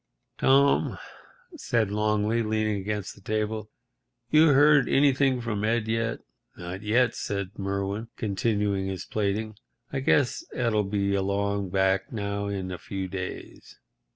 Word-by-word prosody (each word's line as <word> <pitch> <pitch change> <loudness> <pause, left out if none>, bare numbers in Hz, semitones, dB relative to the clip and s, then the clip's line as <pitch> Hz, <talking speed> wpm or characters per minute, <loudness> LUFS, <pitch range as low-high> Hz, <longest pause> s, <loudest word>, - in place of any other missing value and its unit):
"Tom," 140 +1 +3 0.6
said 120 - 0
Longley, 105 +2 +1
leaning 110 -1 0
against 100 0 -4
the - - -18
table, 110 +1 -2 0.6
"you 155 +1 +6
heard 145 -1 +5
anything 135 -2 +3
from 105 -3 -3
Ed 110 0 +1
yet?" 115 +1 -1 0.4
"Not 90 +2 -6
yet," 115 +3 +2
said 100 -2 -3
Merwin, 100 +3 -2
continuing 100 -2 0
his 95 -2 -4
plaiting. 105 +1 -2 0.4
"I 135 - 0
guess 135 -1 +2
Ed'll 115 -4 +1
be 100 0 0
along 100 0 0
back 95 0 +1
now 100 -2 -3
in 95 -2 -3
a 90 - -6
few 95 -1 -5
days." 90 0 -7
105 Hz, 130 wpm, -26 LUFS, 100-115 Hz, 0.6 s, you